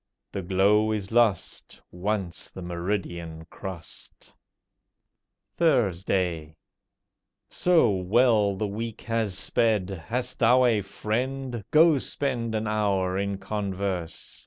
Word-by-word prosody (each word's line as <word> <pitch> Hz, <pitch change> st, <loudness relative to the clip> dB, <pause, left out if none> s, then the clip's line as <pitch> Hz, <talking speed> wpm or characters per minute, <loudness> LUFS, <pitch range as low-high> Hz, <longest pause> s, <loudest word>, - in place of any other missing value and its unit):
The 100 Hz, -, -3 dB
glow 100 Hz, +4 st, +3 dB
is 105 Hz, -2 st, -3 dB
lost 115 Hz, -4 st, +1 dB
Once 95 Hz, -1 st, -3 dB
the 95 Hz, -, -9 dB
meridian 85 Hz, -2 st, -4 dB
cross'd. 95 Hz, -5 st, -9 dB, 1.2 s
THURSDAY 95 Hz, -, +1 dB, 1.0 s
So 170 Hz, -10 st, +3 dB
well 100 Hz, +2 st, +3 dB
the 105 Hz, -, -2 dB
week 110 Hz, +2 st, -5 dB
has 115 Hz, -4 st, -1 dB
sped, 105 Hz, -5 st, +1 dB, 0.2 s
hast 125 Hz, +2 st, -3 dB
thou 125 Hz, +2 st, +5 dB
a 115 Hz, -4 st, +3 dB
friend, 120 Hz, +4 st, -3 dB
Go 155 Hz, -2 st, +5 dB
spend 120 Hz, -5 st, -2 dB
an 110 Hz, 0 st, -1 dB
hour 100 Hz, -4 st, 0 dB
in 100 Hz, 0 st, -1 dB
converse. 95 Hz, -3 st, -4 dB
105 Hz, 105 wpm, -26 LUFS, 95-115 Hz, 1.2 s, thou